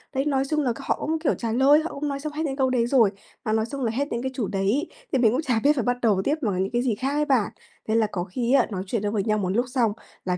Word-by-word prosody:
Đấy, 270 - +1
nói 270 -2 +1
chung 305 -1 +1
là 250 -5 +1
c - - -12
họ - - 0
cũng, 320 +1 -1
kiểu, 315 - +1
trả 230 -2 -3
lời, 275 +5 +5
họ 325 - -4
cũng 290 +1 -3
nói 280 0 -3
xong 300 +1 -5
hết 315 +2 -2
những 270 -2 -2
câu 265 -2 +2
đấy 240 -2 +1
rồi, 240 -6 +4 0.3
mà 215 - 0
nói 220 0 +1
xong 275 +2 -6
là 225 - +1
hết 280 +5 -1
những 235 - -2
cái 260 0 -3
chủ 220 -7 -1
đề 195 - -3
ấy, 240 - +1 0.2
thì 265 - +2
mình 225 -3 +5
cũng 265 +6 0
chả 250 -7 0
biết 295 +1 +5
phải 255 - 0
bắt 245 +1 0
đầu 210 -5 +3
tiếp 295 - +1
bằng 200 -6 0
những 195 - -4
cái 240 - +2
gì 240 -5 0
khác 265 +5 -2
ấy 300 0 +1
bạn. 260 -7 +2 0.4
Thê 220 - +1
là 220 -2 +3
có 175 -2 -2
khi 235 +7 -1
á, 265 -4 +4
nói 185 -2 -3
chuyện 220 0 -1
được 205 - -1
với 200 -3 0
nhau 215 0 +1
một 190 -3 -1
lúc 235 +7 +1
xong 240 -4 +2 0.3
là, 180 -1 0
245 Hz, 340 wpm, -25 LUFS, 215-275 Hz, 0.4 s, lời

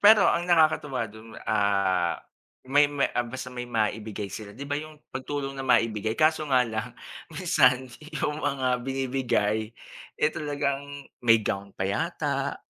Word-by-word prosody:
pero 210 -1 +8
ang 175 +1 +1
nakakatuwa 155 -7 +3
dun, 110 +1 -12
ah, 100 -4 +2 0.5
may 145 +2 +5
may 140 -1 +1
ah, 120 - +2
basta 130 +2 -6
may 125 0 -4
maibigay 110 -2 -1
sila 105 -1 -7
'di 140 +1 -6
ba, 145 - -1
yung 155 0 -9
pagtulong 135 +1 -4
na - - -2
maibigay. 110 -2 +2
Kaso 155 -1 +3
nga 130 -2 +5
lang 110 +1 -4 0.4
minsan, 130 -7 +3 0.3
yung 150 +1 -1
mga 135 -3 0
binibigay, 125 -5 0 0.5
eh, 150 - +3
talagang 145 -1 -3 0.2
may 115 -1 +6
gown 100 0 -2
pa 95 - -1
yata. 100 - -1
130 Hz, 145 wpm, -27 LUFS, 110-145 Hz, 0.5 s, pero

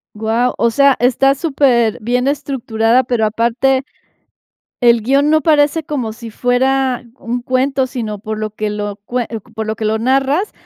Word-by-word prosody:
Guau, 225 +3 0
o 235 - +2
sea, 280 +2 +4
está 265 +3 +3
superbién 250 -4 +1
estructurada, 255 -4 0
pero 235 -3 0
aparte 240 +5 +1 1.0
el 235 -1 +5
guion 275 +5 +2
no 310 0 +4
parece 300 +1 +2
como 260 -8 -3
si 230 0 -10
fuera 255 +2 0
un 240 +1 -3
cuento, 260 +2 0
sino, 230 -5 -5
por 215 +1 -5
lo 215 0 -3
que 215 0 -4
lo 205 -1 -4
cue 245 -1 -2 0.3
por 220 0 -4
lo 220 0 -3
que 220 - -3
lo 220 +1 0
narras, 270 - +1
245 Hz, 160 wpm, -16 LUFS, 220-270 Hz, 1.0 s, el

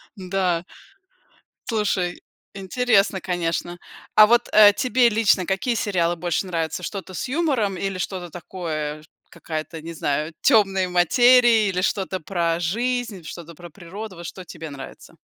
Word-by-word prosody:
Да. 185 -3 -1 1.1
Слушай, 195 -5 -1 0.3
интересно, 200 0 +1
конечно. 175 -1 -3 0.4
А 215 - +9
вот, 240 +2 +3
э, 210 -1 +8
тебе 250 -1 +3
лично 210 -4 +2
какие 195 +5 0
сериалы 175 -5 0
больше 175 +2 -2
нравятся: 165 -1 -3
что-то 190 0 -6
с 180 - -4
юмором 260 - 0
или 195 0 -3
что-то 180 -2 -4
такое, 155 -4 -5 0.3
какая-то, 160 0 -6
не 165 +1 -7
знаю, 150 0 -2
"Темная 195 -7 +3
материя" 230 +5 +5
или 180 -1 -1
что-то 190 -1 -1
про 170 -1 -1
жизнь, 230 +2 -2
что-то 170 0 -9
про 175 +2 -12
природу, 195 +4 -9
вот 170 0 -8
что 185 +3 -8
тебе 160 -1 -9
нравится? 135 -1 -11
185 Hz, 135 wpm, -23 LUFS, 170-215 Hz, 1.1 s, А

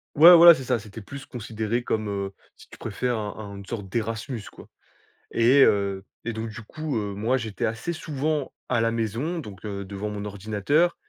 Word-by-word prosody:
Ouais 165 +4 +10
voilà 170 0 +11
c'est 135 - -5
ça 125 -2 0
c'était 105 +1 -10
plus 135 +6 -9
considéré 115 -2 -3
comme, 110 -2 -1
heu, 100 -1 -3 0.2
si - - -17
tu - - -13
préfères 120 +3 -2
un 105 -1 -4 0.2
un 100 - -8
une 100 - -9
sorte 100 -2 -6
d'Erasmus 115 +2 -3
quoi. - - -15 0.6
Et 125 +4 +5
heu 100 -1 +2 0.2
et 120 - -2
donc 110 +1 -4
du 110 +1 -8
coup, 155 +5 -5
heu, 105 -3 -2
moi 115 +6 +1
j'étais 110 -4 -3
assez 115 +9 -2
souvent 155 -3 -2 0.2
à 125 - +2
la 115 0 +2
maison 115 - -2
donc, 105 - -9
heu, 100 -1 -4
devant 100 +2 -5
mon 105 0 -5
ordinateur 105 - +1
115 Hz, 200 wpm, -25 LUFS, 105-130 Hz, 0.6 s, voilà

